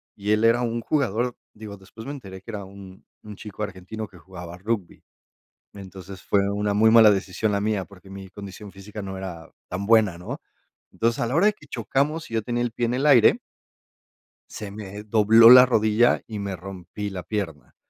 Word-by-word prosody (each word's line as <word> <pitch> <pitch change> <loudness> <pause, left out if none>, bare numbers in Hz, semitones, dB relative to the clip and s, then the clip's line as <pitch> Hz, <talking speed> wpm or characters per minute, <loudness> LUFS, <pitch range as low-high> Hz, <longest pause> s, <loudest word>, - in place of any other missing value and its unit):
y 105 +1 -3
él 105 +1 +2
era 115 +2 +4
un 115 0 -2
jugador, 125 -4 -1 0.2
digo, 105 -2 -10
después 100 +4 -13
me 140 - -4
enteré 95 -9 -10
que 105 - -15
era 100 -2 -6
un 95 -1 -13 0.2
un 105 -1 -10
chico 105 0 -10
argentino 105 +2 -6
que 95 -3 -18
jugaba 90 -1 -10
rugby. 100 -1 -4 0.7
Entonces, 95 -1 -11
fue 100 - +2
una 105 0 -1
muy 110 +2 +4
mala 110 -2 +7
decisión 100 +2 -1
la 100 - 0
mía, 105 -1 -1
porque 95 0 -17
mi 95 -1 -10
condición 100 +1 -10
física 100 +2 -9
no 95 -1 -6
era 85 -4 -8 0.2
tan 95 +2 -4
buena, 105 -5 +3
¿no? 90 - -7 0.5
Entonces, 115 +1 -1
a 120 - 0
la 130 - -1
hora 195 - +4
de 210 - +4
que 150 -9 -20
chocamos 140 +7 -2
y 115 - -9
yo 110 - 0
tenía 120 0 -2
el 120 - -3
pie 120 0 -1
en 120 - -1
el 135 +4 0
aire 125 -6 +6 1.1
se 105 -2 -8
me 105 0 -8
dobló 110 +2 +6
la 125 0 +9
rodilla 110 0 +3
y 110 -2 -6
me 100 -2 -4
rompí 95 +2 -7
la 95 -3 -7
pierna. 80 - -5
105 Hz, 200 wpm, -24 LUFS, 95-115 Hz, 1.1 s, la